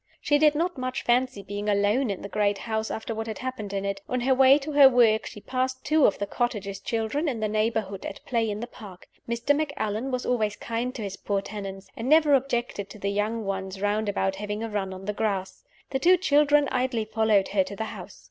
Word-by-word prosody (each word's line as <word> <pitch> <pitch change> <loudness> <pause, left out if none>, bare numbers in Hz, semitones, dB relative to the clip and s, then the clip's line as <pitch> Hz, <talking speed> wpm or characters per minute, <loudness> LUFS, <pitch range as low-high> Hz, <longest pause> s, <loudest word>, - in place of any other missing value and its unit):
She 290 0 +2
did 300 -1 +5
not 340 -1 -1
much 255 0 -3
fancy 245 -3 +1
being 205 +2 -4
alone 205 +5 +2
in 195 - -4
the - - -4
great 205 0 +1
house, 220 0 -3
after 220 +1 -4
what 225 0 -4
had 220 - -4
happened 255 -6 -5
in 200 0 -2
it. 200 0 -3
On 250 -1 -1
her 265 +2 +3
way 265 +1 +6
to 300 +1 -5
her 285 -2 +8
work 230 -4 +3
she 210 - -9
passed 260 +3 -2
two 310 -2 +5
of 200 - 0
the 200 - -2
cottagers' 205 -3 -2
children 230 +8 -1
in 240 -5 -3
the 215 - 0
neighborhood 215 -2 -1
at - - -9
play 230 -3 0
in 210 +1 -4
the - - -3
park. 205 -7 -13 0.2
Mr. 235 +5 +1
Macallan 270 -6 -2
was 255 -1 -2
always 215 -4 0
kind 235 +4 -3
to 225 - -5
his 195 -1 -5
poor 200 -1 -1
tenants, 195 -1 -7
and 230 +3 -4
never 305 -1 +5
objected 240 -6 0
to - - -10
the 200 0 -2
young 210 +2 -1
ones 190 0 -4
round 205 +1 0
about 195 -1 -1
having 210 +2 -4
a 225 - -3
run 200 -3 -2
on 190 0 -8
the 210 - -2
grass. 195 -3 -2 0.3
The 265 - 0
two 360 +6 +5
children 295 -4 +4
idly 250 -3 0
followed 220 -2 +2
her 195 -1 +2
to 200 - -8
the 220 - -3
house. - - -10
220 Hz, 235 wpm, -26 LUFS, 205-260 Hz, 0.3 s, her